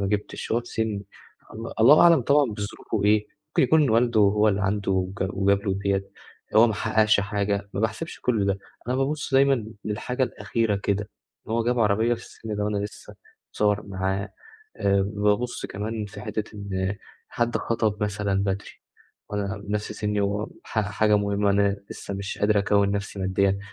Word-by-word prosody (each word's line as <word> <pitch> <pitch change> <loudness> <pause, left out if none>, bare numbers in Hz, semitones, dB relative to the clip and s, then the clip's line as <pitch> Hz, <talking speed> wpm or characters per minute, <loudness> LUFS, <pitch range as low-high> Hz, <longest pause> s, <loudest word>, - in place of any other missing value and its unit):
ما 100 - 0
جبتش، 105 +1 -3
وهو 115 +2 +2
في 120 - -16
سني، 105 -4 -2 0.5
ال 115 0 -6
الله 135 +7 +8
أعلم 170 -5 +7
طبعًا 145 +4 +4
بظروفه 105 0 -4
ايه، 105 0 +3 0.2
ممكن - - +2
يكون 155 -6 +4
والده 115 -1 +3
هو 105 +1 +4
اللي 100 -1 +1
عنده 100 0 0 0.3
امك 95 - -1
وجاب 100 0 +2
له 95 - +1
ديّة، 100 0 -1 0.5
هو 115 - +8
ما 110 - 0
حققش 110 -1 +3
حاجة، 100 0 -1
ما 100 - -3
باحسبش 110 +9 -3
كل 110 -5 +1
ده، 100 0 0 0.3
أنا 125 - +1
بابُص 140 +1 -1
دايمًا 135 -4 +4 0.2
للحاجة 125 +5 -2
الأخيرة 110 -2 0
كده، 100 0 -1 0.4
إن 110 - -4
هو 115 0 +1
جاب 125 0 +1
عربية 110 +3 +3
في 115 - -10
السن 110 -2 -7
ده 105 - -1
و - - 0
أنا 105 - -1
لسه، 105 +1 -7 0.4
اتصور 105 0 +1
معاها 95 +1 -2 0.4
آآ 100 0 +2
بابُص 105 +4 0
كمان 105 +2 -4
في 100 0 -10
حِتّة 105 0 -3
إن 100 -1 -2 0.3
حد 120 0 0
خطب 110 -2 -1
مثلًا 100 -1 0
بدري، 100 0 -2 0.6
وأنا 105 +1 -2
بنفْس 105 +1 -3
سني، 105 -1 -1
وح 100 +1 -1 0.3
حاجة 105 +1 +2
مهمة 100 0 +1
أنا 100 0 +2
لسه 100 - -6
مش 100 0 -5
قادر 105 0 +3
أكوّن 100 0 +2
نفْسي 100 0 -4
ماديًا، 95 +1 +1
105 Hz, 175 wpm, -25 LUFS, 100-110 Hz, 0.6 s, الله